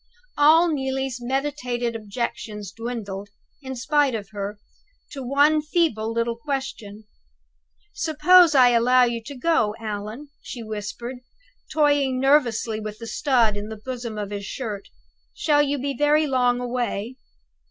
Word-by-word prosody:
All 315 +4 +6
Neelie's 265 -4 -2
meditated 250 -2 -2
objections 210 -2 -5
dwindled, 205 -3 -6 0.3
in 265 -1 -6
spite 275 +1 +1
of 205 -2 -6
her, 205 0 -5 0.5
to 275 - -6
one 285 +4 +3
feeble 300 -9 0
little 230 0 -1
question. 230 -5 -5 0.9
"Suppose 325 +1 +5
I 255 -2 +7
allow 245 +2 +4
you 235 -1 0
to 280 - -8
go, 245 -7 +1
Allan?" 215 +6 -6
she 240 - -7
whispered, 220 +4 -6 0.5
toying 285 -4 +2
nervously 245 -5 +2
with 215 -1 -6
the 230 - -8
stud 235 -4 +2
in 205 +1 -5
the 220 - -7
bosom 240 -4 -5
of 205 -1 -4
his 200 -1 -5
shirt. 215 -7 -5 0.5
"Shall 295 -2 +3
you 290 0 0
be 280 +1 -3
very 295 +3 +3
long 250 -3 +2
away?" 245 -1 -3
245 Hz, 135 wpm, -23 LUFS, 220-285 Hz, 0.9 s, I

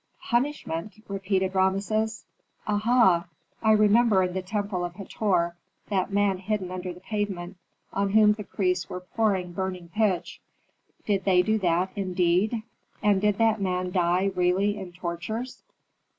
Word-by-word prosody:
"Punishment?" 235 - -1
repeated 190 -1 -1
Rameses. 200 +4 0 0.4
"Aha! 210 -5 +3 0.3
I 220 - +4
remember 215 -1 +5
in 180 -1 -2
the 190 - -2
temple 200 -1 -2
of 175 0 -5
Hator, 180 -3 0 0.3
that 195 -1 0
man 200 -2 +2
hidden 195 -1 -2
under 185 0 -4
the 180 +1 -12
pavement, 195 -3 -4 0.4
on 200 0 0
whom 210 +1 +5
the 210 0 -7
priests 180 -2 -1
were 180 - -5
pouring 190 -2 0
burning 185 -2 -4
pitch. 210 -5 0 0.6
Did 200 -2 0
they 180 -2 +4
do 215 +3 +1
that, 180 0 +1
indeed, 190 +3 +1 0.4
and 205 -2 +3
did 210 -1 +2
that 225 -2 +2
man 180 -1 -1
die 180 +2 +2
really 185 +3 +2
in 185 -2 -7
tortures?" 180 +8 -5
195 Hz, 140 wpm, -26 LUFS, 180-210 Hz, 0.6 s, remember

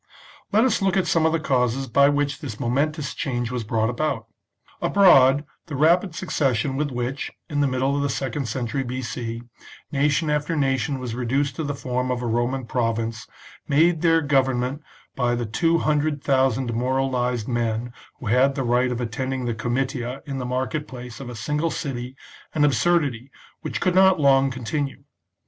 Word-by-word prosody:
Let 220 +3 +4
us 255 -6 +2
look 195 -1 +2
at 190 - +2
some 160 -1 +3
of - - +1
the 165 - +1
causes 130 -2 0
by 140 +3 +4
which 145 -1 0
this 115 -8 -6
momentous 145 +5 -1
change 120 -3 -2
was 125 -2 -2
brought 110 +1 0
about. 125 -3 -2 0.6
Abroad, 140 -8 +5 0.2
the 150 - -5
rapid 165 +4 +3
succession 135 -8 0
with 145 +1 -1
which, 125 +2 -3 0.2
in 145 - 0
the 140 - +3
middle 130 +2 0
of 145 - 0
the 140 - 0
second 135 0 -2
century 125 +3 -2
B.C., 120 -2 -4 0.5
nation 150 +2 +1
after 150 +2 0
nation 135 -1 0
was 125 -3 -5
reduced 130 +4 -1
to 160 - -2
the 145 -1 -3
form 125 -1 -2
of 125 -1 -2
a - - -2
Roman 120 +3 -1
province, 115 -2 -2 0.4
made 160 +3 +3
their 165 -1 +4
govern 135 -4 +2
ment 130 +4 -3 0.3
by 120 -2 +1
the 120 0 -2
two 165 +10 +1
hundred 150 -2 0
thousand 135 -2 +2
demoralised 125 -1 -1
men 120 0 -1 0.3
who - - -9
had 130 +5 +3
the 135 - -1
right 125 +1 +2
of 120 - -3
attending 130 +2 -3
the 120 - -1
comitia 125 +2 -2
in 135 -2 -4
the 125 - -4
market 130 +4 -2
place 125 -2 -9
of 135 -3 -7
a 120 - -7
single 150 +8 -1
city, 130 -4 -5 0.4
an 150 -1 +4
absurdity 140 -2 +1 0.3
which - - -4
could 185 - +1
not 190 -1 +5
long 135 -1 +4
continue. 135 +3 -4
135 Hz, 180 wpm, -23 LUFS, 120-145 Hz, 0.6 s, Abroad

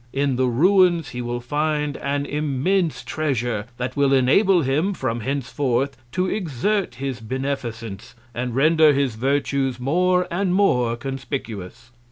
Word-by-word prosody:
In 140 -1 +1
the 130 +1 +1
Ruins, 175 +4 +3
he 125 - -5
will 120 0 -3
find 150 +2 -1
an 140 0 -2
immense 150 +5 0
Treasure, 120 -8 -2
that 125 +1 -4
will 140 -1 +3
enable 165 +8 +4
him, 155 +9 0
from 120 -6 -2
henceforth, 135 +1 -1 0.2
to 185 0 +1
exert 185 - -1
his 135 -1 -4
Beneficence, 115 -4 -5 0.2
and 120 0 -3
render 155 +2 +5
his 135 -3 0
Virtues 135 +1 0
more 180 +7 +2
and 185 +1 0
more 125 -12 +2
conspicuous. 120 -4 -6
135 Hz, 135 wpm, -22 LUFS, 125-155 Hz, 0.2 s, render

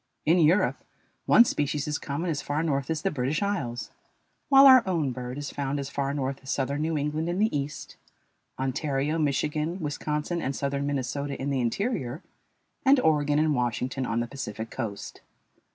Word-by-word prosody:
In 165 +4 +4
Europe 170 +5 +3 0.4
one 240 - +7
species 145 - -1
is 150 -1 -1
common 160 +5 -3
as 145 - -2
far 150 +2 -1
north 140 -5 -1
as 160 -2 -2
the 195 - +1
British 145 +6 -1
Isles, 140 -13 -3 0.6
while 275 0 +8
our 260 -2 +9
own 160 -7 0
bird 125 +1 -6
is 145 -1 -5
found 140 0 -2
as 140 0 -5
far 140 -1 -1
north 135 -1 -2
as 135 - -11
southern 140 +2 -1
New 160 0 0
England 150 +3 -1
in 175 - -1
the 215 -3 +1
East, 145 0 -5 0.6
Ontario, 140 +3 -1
Michigan, 150 +4 0
Wisconsin, 150 +2 -2
and 135 +1 -2
southern 140 +1 -2
Minnesota 140 +1 -3
in 140 +1 -2
the 135 -2 0
interior, 140 - -2 0.6
and 270 0 +5
Oregon 150 - +2
and 155 0 +3
Washington 125 +1 -1
on 115 +1 0
the 120 - -3
Pacific 115 -4 -6
coast. 110 -6 -6
145 Hz, 175 wpm, -27 LUFS, 135-160 Hz, 0.6 s, our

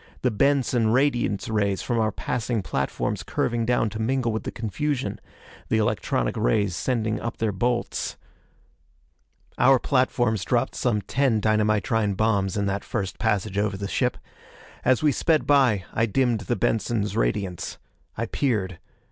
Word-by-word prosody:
The 125 - +3
Benson 130 -1 +2
radiance 120 -5 +1
rays 100 -3 0
from 120 -1 0
our 110 -1 +1
passing 115 +1 -2
platforms 70 -5 -2
curving 115 -2 -1
down 120 -2 +2
to 110 - -6
mingle 125 +1 0
with 110 - -3
the - - -3
confusion. 135 +5 -3 0.5
The 110 - +2
electronic 85 - 0
rays 90 +10 +1
sending 110 -3 -1
up 115 - -5
their 110 -2 0
bolts.... 120 +5 -1 1.4
Our 135 0 +6
platforms 120 -6 +1
dropped - - 0
some 105 -4 0
ten 130 +1 +1
dynamitrine 110 -1 +1
bombs 100 -3 +1
in 100 - 0
that 100 0 -2
first 95 -1 -4
passage 100 0 0
over 105 -1 0
the 100 0 -4
ship. - - 0 0.7
As 130 +3 +3
we 150 - +5
sped 155 +3 +1
by, 125 -10 +3
I 115 +1 +2
dimmed 120 0 +1
the - - +1
Benson's 110 -2 0
radiance. 90 +9 -1 0.4
I 115 - -1
peered. 105 -8 -1
110 Hz, 150 wpm, -25 LUFS, 100-125 Hz, 1.4 s, Our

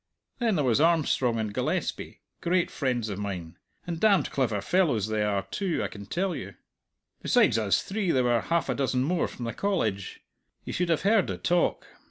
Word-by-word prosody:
Then 230 -4 +1
there 150 -4 +1
was 125 +3 +3
Armstrong 155 -7 +2
and 110 -2 -2
Gillespie - - -3 0.2
great 175 0 +1
friends 125 -5 -1
of 100 -2 -4
mine, 90 -4 -5 0.3
and 170 -2 -4
damned 205 -2 +3
clever 115 -7 0
fellows 120 - +1
they 110 -1 0
are, 100 -2 0
too, 190 -4 -1
I - - -2
can 100 -1 -10
tell 185 - -1
you. - - -7 0.7
Besides 180 - +3
us 105 -3 +1
three 195 -2 -2
there 130 -6 +3
were 120 -2 +2
half 170 0 0
a - - 0
dozen 130 -2 0
more 170 +4 0
from 120 - -7
the 115 - -3
College. 110 - -2 0.4
You - - -5
should 180 -1 -1
have 165 - +1
heard 205 -1 +3
the - - -3
talk! 175 0 +1
135 Hz, 195 wpm, -27 LUFS, 110-180 Hz, 0.7 s, was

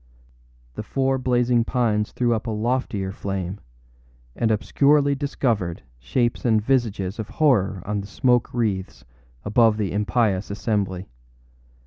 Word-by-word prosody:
The - - -5
four 135 0 0
blazing 125 -1 +2
pines 115 -4 0
threw 120 -1 +1
up 115 +1 -3
a - - -1
loftier 110 -3 -1
flame, 95 -1 -4 0.8
and 115 - +1
obscurely 140 +6 +3
discovered 120 - -1 0.2
shapes 120 - -1
and 110 -3 +3
visages 110 -5 -1
of 110 - -4
horror 100 - +2
on 105 0 -2
the 100 - -9
smoke 125 +2 +1
wreaths 95 - -2 0.4
above 110 +1 +4
the 105 -3 -1
impious 105 -1 0
assembly. 100 -3 -2
110 Hz, 125 wpm, -23 LUFS, 100-125 Hz, 0.8 s, above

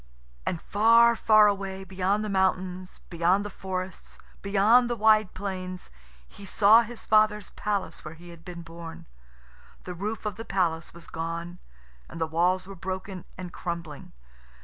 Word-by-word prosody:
And 170 - -1
far, 230 +3 +5
far 215 -1 +6
away, 195 -2 -1
beyond 190 +3 -1
the - - -4
mountains, 185 -1 -1
beyond 175 +4 +2
the 205 - -6
forests, 185 -1 -6 0.2
beyond 215 +5 +4
the 240 - 0
wide 215 -2 +3
plains, 185 -2 -6 0.4
he 200 - -14
saw 210 +3 +6
his 235 0 -8
father's 215 -1 +3
palace 200 -3 -3
where 160 - -8
he 175 +2 -14
had 170 -1 -13
been 170 0 -8
born. 165 0 -10 0.8
The 180 - -6
roof 210 +5 -5
of 205 -2 -3
the 225 - -6
palace 170 -6 -1
was 170 0 -11
gone, 170 +2 -5 0.5
and - - -9
the 160 - +1
walls 175 +3 +1
were 195 - -9
broken 190 0 -6
and 180 -1 -7
crumbling. 170 -4 -6
190 Hz, 155 wpm, -27 LUFS, 175-210 Hz, 0.8 s, far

